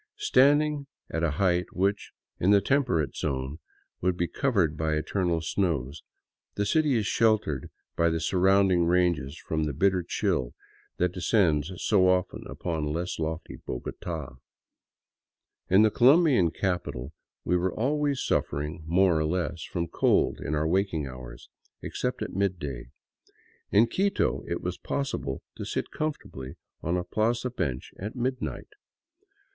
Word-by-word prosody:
Standing 145 - +3 0.2
at 80 - -1
a 85 - +2
height 90 -2 +2
which, 100 +2 0 0.3
in 90 - +2
the 100 0 +7
temperate 100 - +1
zone, 70 +1 -3 0.4
would 90 0 +1
be 85 - 0
covered 100 - +1
by 80 0 0
eternal 85 +1 0
snows, 80 -6 -1 0.5
the 100 - 0
city 150 +3 +2
is 110 -3 +1
sheltered 110 - +1 0.3
by 85 0 +3
the 80 0 -1
surrounding 95 +1 +3
ranges 85 -5 +1
from 80 -1 -2
the 75 - -2
bitter 95 +5 +2
chill 65 -7 -1 0.4
that 90 0 +1
descends 90 -4 +2
so 95 -2 +3
often 90 0 0
upon 80 -4 -3
less 85 +4 -3
lofty 80 0 -4
Bogota. 75 +2 -6 1.3
In 95 +3 +6
the 110 - +4
Colombian 135 - +5
capital 85 -7 -3 0.3
we 90 - +2
were 90 +1 +1
always 145 +2 0
suffering 75 +3 -1
more 90 +1 +4
or 80 - +1
less 85 0 -2
from 85 +3 -3
cold - - +2
in 75 - -2
our 75 +1 +1
waking 90 -3 0
hours, 65 -2 -9 0.4
except - - -3
at - - -6
midday; 90 -11 -2 0.8
in 105 +3 +5
Quito 195 +10 0
it 85 - -3
was 90 0 -3
possible 135 - -3
to - - -5
sit - - -3
comfortably 70 - -5 0.3
on 85 +3 0
a 90 - -1
plaza 115 +6 0
bench 65 - -3
at 105 +5 -5
midnight. 130 +1 -3
90 Hz, 140 wpm, -27 LUFS, 80-105 Hz, 1.3 s, the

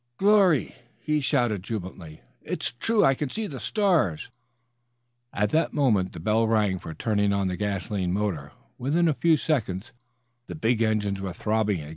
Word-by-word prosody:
"Glory!" 195 -7 +4 0.3
he 150 -1 0
shouted, 120 - +1
jubilantly. 90 -6 -7 0.2
"It's - - -3
true. 225 -2 +3
I 135 - +5
can 140 +1 -3
see 220 +7 -3
the 140 -10 -7
stars." 170 - 0 1.0
At 105 0 0
that 160 - +1
moment 110 -11 +2
the - - -8
bell 110 +6 +1
rang 105 -4 +1
for 80 -2 -8
turning 105 -2 +1
on 100 -1 0
the 90 - -2
gasoline 100 -2 -2
motor. 90 -8 -2 0.3
Within 155 +7 +1
a 155 - +3
few 155 +5 +3
seconds 120 - -2 0.5
the - - -7
big 115 -5 0
engines 105 -3 0
were 95 -2 -4
throbbing. 105 -6 -1
110 Hz, 160 wpm, -26 LUFS, 95-145 Hz, 1.0 s, I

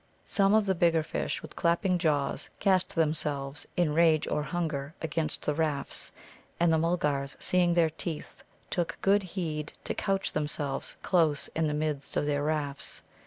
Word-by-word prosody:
Some 200 +1 +3
of 220 -1 +4
the 190 - +3
bigger 165 -2 +3
fish, - - -3
with - - -10
clapping 175 +2 +2
jaws, 150 -4 0
cast 190 -2 +2
themselves 150 -3 0
in 170 -4 +2
range 160 -1 +4
or 150 - 0
hunger 155 -2 -3
against 160 -1 -2
the 150 - +1
rafts. 150 -2 0 0.5
And 170 -1 +4
the 160 - +3
Mulgars, 150 -5 0
seeing 175 -1 +2
their 165 -2 +4
teeth, 160 0 -6 0.3
took 170 -2 -1
good 200 +1 +4
heed 165 -5 -4
to - - -1
couch 195 -1 0
themselves 145 -2 -2
close 160 -5 +2
in 160 -1 0
the 150 - -1
midst 150 -2 -2
of - - +1
their 145 -1 0
rafts. 145 -2 -1
160 Hz, 165 wpm, -29 LUFS, 150-175 Hz, 0.5 s, of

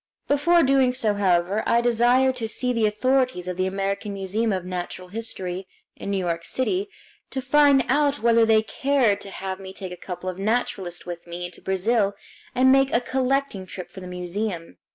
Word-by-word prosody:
Before 335 +4 +4
doing 265 -2 +3
so, 220 -5 +1
however, 190 0 +1
I 235 - +4
desired 245 +2 +3
to 225 -2 -2
see 250 +3 -1
the 225 -2 +2
authorities 250 -3 +1
of 180 - -3
the 185 +1 0
American 195 +1 -2
Museum 205 +4 -1
of 185 -2 -2
Natural 180 0 -5
History, 190 -4 -5 0.3
in - - -7
New 200 - 0
York 170 -3 -2
City, 370 - -1 0.4
to 265 - -3
find 280 +1 +4
out 290 -1 +2
whether 230 0 +4
they 220 -1 +4
cared 260 -4 +1
to 200 - -8
have 190 0 -5
me 190 -1 -9
take 190 -1 -7
a - - -5
couple 180 0 -7
of 185 0 -4
naturalists 195 -5 -1
with 175 -1 -7
me 175 +1 -5
into 175 - -9
Brazil 200 +2 +1 0.4
and 260 +1 +5
make 270 0 +4
a - - +3
collecting 260 -5 -1
trip 185 -1 -8
for - - -10
the 185 - -8
museum. 180 0 -4
210 Hz, 190 wpm, -24 LUFS, 185-255 Hz, 0.4 s, and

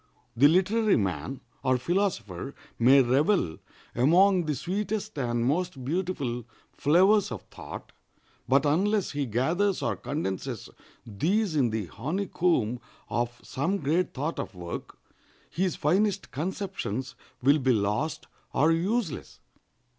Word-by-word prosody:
The 135 +5 +7
literary 200 +6 +3
man 95 - -2 0.2
or 130 0 +2
philosopher 135 - -2 0.2
may 130 +3 +7
revel 130 - +2 0.3
among 175 +8 +4
the 150 - 0
sweetest 200 - -3
and 120 -2 0
most 145 -1 -1
beautiful 145 -7 -2 0.3
flowers 190 +6 +4
of 110 - -5
thought, - - -9 0.6
but 135 +3 +4
unless 195 +7 +2
he 145 -2 -2
gathers 170 - +1
or - - 0
condenses 140 - -4 0.4
these 165 - 0
in 130 -5 +3
the 110 -2 -2
honeycomb 150 - 0 0.3
of 120 0 -1
some 170 +9 -1
great 165 +3 0
thought 150 +5 -2
or - - -3
work, 85 -1 -7 0.5
his 180 0 0
finest 195 +6 +1
conceptions 160 - -3 0.3
will 140 +3 +5
be 130 -1 +2
lost 105 +8 0 0.3
or 155 +4 +4
useless. 185 - -1
150 Hz, 120 wpm, -27 LUFS, 125-185 Hz, 0.6 s, The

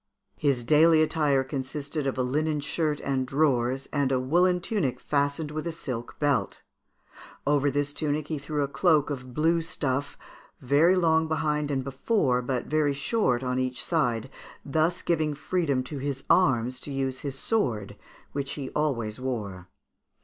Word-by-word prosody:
His 135 -5 +1
daily 155 +4 +5
attire 150 -4 +2
consisted 140 +2 -4
of 135 - -2
a 130 - +1
linen 150 +4 0
shirt 150 +1 -1
and 130 -2 -1
drawers, 135 -2 +1
and 140 -2 +1
a 130 - +2
woollen 175 +7 +3
tunic 175 - -1
fastened 145 +1 -1
with 155 +2 -4
a - - -1
silk 125 -7 -6
belt. 145 -4 0 0.9
Over 145 0 +3
this 145 +1 -1
tunic 150 0 -2
he 155 -3 -3
threw 145 +1 -2
a - - -1
cloak 155 -1 +2
of 130 -3 -6
blue 165 +2 +2
stuff, 145 -4 -2 0.4
very 150 +8 +4
long 160 -3 +3
behind 150 -2 0
and 135 -2 -1
before, 135 - +1
but 125 0 -2
very 150 -2 +1
short 135 - +1
on 125 0 -1
each 130 -1 -2
side, 130 -6 0 0.3
thus 160 +5 0
giving 155 -3 0
freedom 145 -5 0
to 140 +2 -6
his 135 0 -3
arms 125 -7 +3
to 145 - -8
use 135 -1 -2
his 140 -2 -5
sword, 120 - -1 0.4
which 140 -1 -3
he 135 -3 -6
always 120 -7 -1
wore. 105 -8 -4
145 Hz, 160 wpm, -27 LUFS, 130-155 Hz, 0.9 s, daily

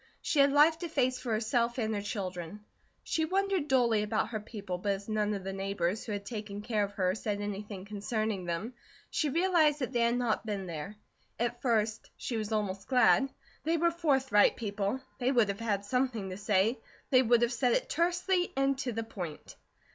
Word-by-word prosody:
She 310 - 0
had 280 0 +6
life 305 +3 +5
to 345 - -4
face 255 -4 +1
for 245 - -4
herself 235 +2 +1
and 220 -3 0
her 205 - -1
children. 195 -1 -5 0.4
She 320 - 0
wondered 385 -1 0
dully 240 -6 +3
about 215 +1 0
her 220 -2 -3
people, 205 -4 -6
but 200 +2 0
as 195 +1 -7
none 210 -1 0
of 195 - -5
the 195 0 -4
neighbours 195 0 -1
who 225 - -6
had 200 -1 -4
taken 210 -1 -6
care 215 -2 0
of 200 0 -4
her 185 -2 +1
said 210 -1 -3
anything 205 -1 -5
concerning 210 -1 -2
them, 175 +8 -3 0.4
she 305 - +1
realized 330 -2 +3
that 255 -4 -3
they 240 - +1
had 235 +1 +3
not 240 -3 0
been 205 -3 -3
there. 170 +4 -6 0.4
At 240 0 -1
first 220 -3 0
she 240 - -4
was 215 -1 -3
almost 200 -3 -2
glad. 250 -1 +4 0.3
They 330 +2 +1
were 340 +1 +3
forthright 270 -10 +3
people. 205 +2 -2 0.2
They 250 +1 +2
would 235 -6 +3
have 200 +1 -3
had 205 -3 -1
something 235 -4 -1
to 185 - -5
say; 210 +3 +2 0.3
they 255 -1 +7
would 240 -1 +4
have 240 +1 +1
said 245 0 +2
it - - +1
tersely 355 +2 +1
and 275 0 +2
to 250 -4 -2
the 225 +1 -2
point. 180 -8 -7
220 Hz, 200 wpm, -31 LUFS, 205-260 Hz, 0.4 s, they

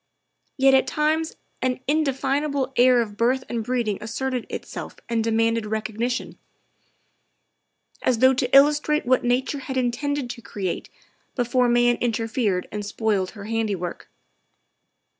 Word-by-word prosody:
Yet 270 0 +5
at 265 - +4
times 315 +1 0 0.3
an 255 0 0
indefinable 280 -1 0
air 250 0 +5
of 210 -3 -5
birth 255 +3 +2
and 235 -2 -3
breeding 235 -4 -1
asserted 250 +2 -3
itself - - -6
and 230 -1 0
demanded 225 0 +1
recognition, 220 +3 -3 1.6
as 250 - +2
though 260 +3 +5
to 250 -1 -1
illustrate 300 +2 +4
what 255 +1 +3
nature 255 +4 0
had 265 0 -5
intended 260 +2 -1
to 235 - -9
create 190 -5 -4 0.5
before 245 0 +2
man 240 0 +3
interfered 225 -4 -1
and 210 0 -4
spoiled 205 -2 -1
her 200 - -8
handiwork. 210 -6 -3
245 Hz, 125 wpm, -24 LUFS, 225-265 Hz, 1.6 s, Yet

